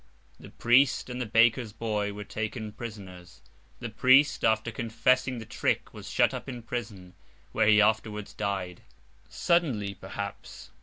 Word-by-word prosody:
The - - -12
priest 125 +1 +2
and 125 +1 -4
the 120 - -3
baker's 115 0 +3
boy 105 -2 -2
were 105 +1 -7
taken 110 +1 -5
prisoners. 95 -6 -10 0.4
The 120 - -5
priest, 130 +6 +4
after 110 +1 +2
confessing 120 +3 0
the 115 - -7
trick, - - -2
was - - -9
shut - - +2
up - - -6
in 120 -3 -7
prison, 105 -7 -6 0.4
where 110 - +2
he 105 0 +6
afterwards 105 -1 0
died—suddenly 100 - -2
perhaps. - - -8
110 Hz, 140 wpm, -28 LUFS, 105-120 Hz, 0.4 s, he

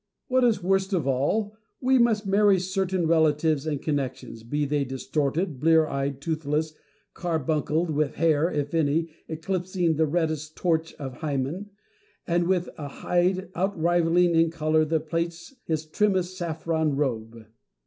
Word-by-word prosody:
What 255 0 +3
is 230 -6 +2
worst 195 +1 +1
of 170 -7 +1
all, 200 +12 0 0.2
we 260 0 +3
must 225 -3 +3
marry 200 0 +4
certain 185 -1 -1
relatives 160 -2 +2
and 145 -3 -1
connections, 135 -6 -3
be 145 +6 -2
they 145 0 0
distorted, 140 +4 -2
blear 160 +2 +4
eyed, 140 -1 -3
toothless, 155 0 -1 0.4
carbuncled, 160 0 -1
with 150 -1 0
hair 160 0 +2
(if 145 0 -2
any) 160 +1 +1 0.2
eclipsing 175 0 -1
the 160 0 +3
reddest 155 -1 -1
torch 165 -2 0
of 135 -4 -7
Hymen, 155 +6 -3 0.6
and 170 0 +1
with 180 -1 +1
a 145 - -4
hide 180 +5 0
outrivalling 175 -1 +2
in 165 0 +4
colour 155 -1 +1
and 160 -1 +1
plaits 170 - -3
his 160 -1 -2
trimmest 185 +1 0
saffron 160 -3 -1
robe. 115 -5 -3
160 Hz, 140 wpm, -26 LUFS, 150-180 Hz, 0.6 s, marry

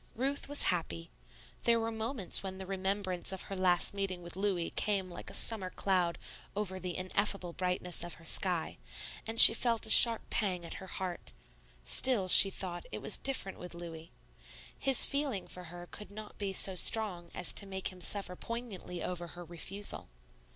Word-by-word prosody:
Ruth 275 +4 -4
was 290 - +1
happy. 85 - -7 0.5
There 235 -1 +2
were 225 0 -4
moments 220 -2 -1
when 190 -1 -8
the 190 - -9
remembrance 190 -1 -4
of 190 - -7
her 195 - -9
last 180 -1 0
meeting 195 -3 -6
with 170 -1 -11
Louis 190 -3 -3
came 195 -3 -3
like 175 - -8
a - - -12
summer 205 -5 0
cloud 180 -3 -2 0.4
over 195 -2 -5
the 180 -1 -6
ineffable 185 -1 -3
brightness 180 -1 -3
of 175 -1 -9
her 165 - -18
sky, 175 0 -2 0.5
and 225 +1 -2
she - - +15
felt 230 -1 -1
a 220 - +2
sharp 230 -2 +5
pang 185 -5 -2
at - - -8
her 190 - -11
heart; 185 -2 -7 0.5
still, 215 - 0
she 195 +2 +9
thought, 180 -2 -8
it 105 - -6
was - - -4
different 260 -8 -1
with 180 -1 -10
Louis. 165 -1 -11 0.6
His 270 -1 +6
feeling 280 -9 -4
for 180 0 -11
her 175 +1 -11
could 210 -2 -11
not 210 +1 -13
be 200 -2 -4
so 190 0 +4
strong 180 -2 +3
as - - -3
to 200 - -2
make 190 -1 -5
him 185 -1 -15
suffer 185 +1 -2
poignantly 215 -6 -8
over 175 -1 -6
her 175 +1 -12
refusal. 180 - -6
190 Hz, 180 wpm, -30 LUFS, 175-210 Hz, 0.6 s, she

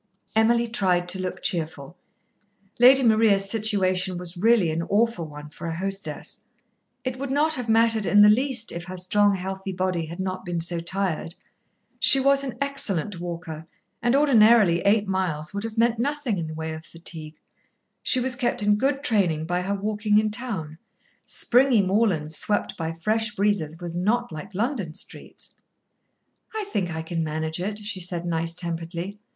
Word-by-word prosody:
Emily 235 +2 +3
tried 185 -6 +1
to 185 +1 -2
look 185 -1 -5
cheerful. 160 -2 -2 0.8
Lady 260 +2 +7
Maria's 215 -4 +4
situation 190 -4 0
was 175 0 -5
really 205 -2 +3
an 160 +1 -2
awful 205 -2 0
one 150 0 -10
for 160 - -8
a 165 - -3
hostess. 195 +3 -4 0.6
It 255 0 -4
would 275 0 -4
not 300 +4 +2
have 250 -5 -3
mattered 225 -2 +3
in 205 0 +6
the - - +8
least 240 +1 +2
if 170 0 -6
her 185 0 -7
strong, 200 +3 +2
healthy 190 +1 -5
body 180 -3 -2
had 170 +3 -9
not 185 0 -3
been 175 -2 -3
so 170 +1 -1
tired. 170 -1 -3 0.6
She 270 - +7
was 275 +1 +3
an 255 -4 -5
excellent 210 - -1
walker, 165 -2 -7 0.3
and 240 +2 +2
ordinarily 225 - +5
eight 205 +2 +2
miles 180 -5 -2
would 200 +1 -3
have 225 0 -6
meant 230 0 +2
nothing 275 -6 -1
in 165 - -3
the 155 - -7
way 160 0 -4
of 160 0 -8
fatigue. 160 -2 -6 0.7
She 255 - +1
was 250 0 0
kept 245 -3 -1
in 205 0 +3
good 275 +2 0
training 175 -9 +1
by 180 +2 -1
her 195 +2 -2
walking 210 +1 0
in 215 0 +2
town, 190 -10 -4 0.5
Springy 245 -3 +3
moorland 190 -6 +1
swept 205 +7 -1
by 165 -1 -3
fresh 215 +6 -1
breezes 195 -7 0
was 170 -1 -6
not 230 +7 0
like 185 +5 -9
London 210 - -2
streets. - - -6 1.0
"I 435 - -2
think 190 - -1
I 160 -1 -4
can 165 0 -3
manage 160 +1 -3
it," 205 +3 -3
she 210 -2 -5
said 175 -1 -2
nice 165 0 -2
temperedly. 170 +3 -5
195 Hz, 170 wpm, -24 LUFS, 170-225 Hz, 1.0 s, the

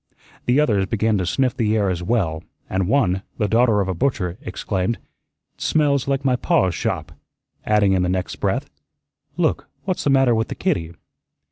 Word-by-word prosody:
The 125 +4 +4
others 105 -10 +2
began 110 0 +1
to 90 - -1
sniff 130 +3 +1
the 110 -1 +1
air 100 -2 +1
as 90 -2 -1
well, 90 -6 0 0.2
and 95 -1 -1
one, 95 -7 +2 0.2
the 105 - +1
daughter 115 -1 +3
of 95 - -1
a 95 - -1
butcher, 90 -3 -1
exclaimed, 100 -6 -2 0.6
"'Tsmells 145 -4 +1
like 140 0 -1
my 130 -2 +3
pa's 125 - +2
shop," - - -3 0.6
adding 105 -2 +4
in 95 - +2
the 90 - 0
next 90 0 -2
breath, - - -1 0.7
"Look, - - 0
what's 185 -2 -2
the - - +1
matter 135 -3 +4
with 110 0 0
the - - -5
kittee?" 85 - -1
110 Hz, 175 wpm, -21 LUFS, 95-130 Hz, 0.7 s, The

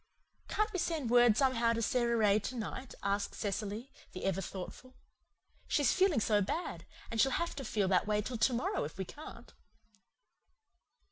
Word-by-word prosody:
"Can't 425 0 0
we 370 - -1
send 310 -9 -1
word 240 -3 +6
somehow 240 -4 +3
to 230 - -1
Sara 235 +1 +1
Ray 210 -1 +4
to 255 - -5
night?" 245 +3 -5
asked 200 0 -1
Cecily, 210 +4 -3 0.2
the 185 - -5
ever 195 0 0
thoughtful. 195 +8 -8 0.7
"She's 285 -6 +3
feeling 375 -7 +3
so 210 -1 +2
bad 320 - -3 0.2
and 225 -1 +2
she'll 270 - +4
have 340 - -1
to 275 - -4
feel 205 -6 0
that 185 +1 +2
way 210 0 +2
till 240 +1 -4
to 255 - +3
morrow 240 - -1
if 150 +3 -6
we 190 - -3
can't." 300 - -11
230 Hz, 175 wpm, -33 LUFS, 205-260 Hz, 0.7 s, word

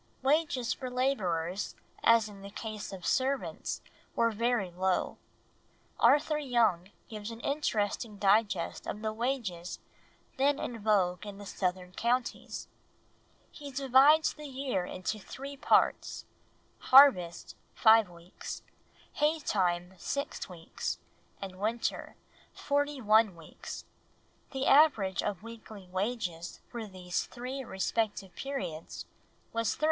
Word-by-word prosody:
Wages 275 -4 +2
for 255 -2 -6
labourers, 195 -9 -1 0.3
as 230 -2 +5
in 200 -2 -11
the 200 - -8
case 215 0 -6
of 190 -2 -8
servants, 265 +1 -1 0.3
were 230 0 +3
very 225 -3 0
low. 185 +1 0 0.8
Arthur 295 +5 +4
Young 230 - +2 0.2
gives 215 -1 -6
an 230 0 -8
interesting 220 -6 -1
digest 200 -2 +2
of 210 - -5
the 215 0 -1
wages 220 -8 -2 0.6
then 280 +2 +3
in 235 -4 -4
vogue 190 -4 +2
in 200 -1 -7
the 205 - -9
southern 180 -2 -2
counties. 240 +5 -2 0.8
He 290 -1 -9
divides 275 +4 +5
the 300 -1 -9
year 260 -9 -2
into 185 +4 -4
three 275 +7 -8
parts: 275 - +2 0.5
harvest, 255 -11 +6 0.2
five 220 -3 +6
weeks; 170 +1 -9 0.5
hay 305 +2 +2
time, 180 - 0
six 280 -7 -3
weeks; 170 -3 -4 0.4
and 190 -1 -7
winter, 225 +3 -2 0.4
forty 285 0 0
one 215 -3 +4
weeks; 165 -2 -9 0.6
the 270 -1 -2
average 225 - +5
of 205 -2 -3
weekly 220 -4 -10
wages 185 -4 -3
for 235 -3 -5
these 180 -2 -3
three 255 +2 -5
respective 200 -2 -2
periods 265 - -5 0.5
was 230 -2 0
13s. - - -25
220 Hz, 120 wpm, -31 LUFS, 190-260 Hz, 0.8 s, harvest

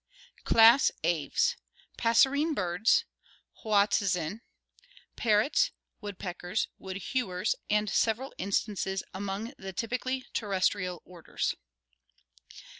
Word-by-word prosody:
Class 230 +4 +6
Aves 165 -4 +1 0.4
Passerine 275 +7 +3
birds. 180 +3 +2 0.6
Hoatzin. 200 -3 +1 0.7
Parrots, 240 - +2 0.3
woodpeckers, 185 -1 -4
wood 190 0 -6
hewers, 195 -4 -1 0.2
and 210 0 +2
several 230 +6 0
instances 195 0 -1
among 200 +5 -4
the 190 0 -7
typically 255 +5 -3
terrestrial 185 -3 -1
orders. 175 -2 -3
205 Hz, 80 wpm, -29 LUFS, 185-230 Hz, 0.7 s, Class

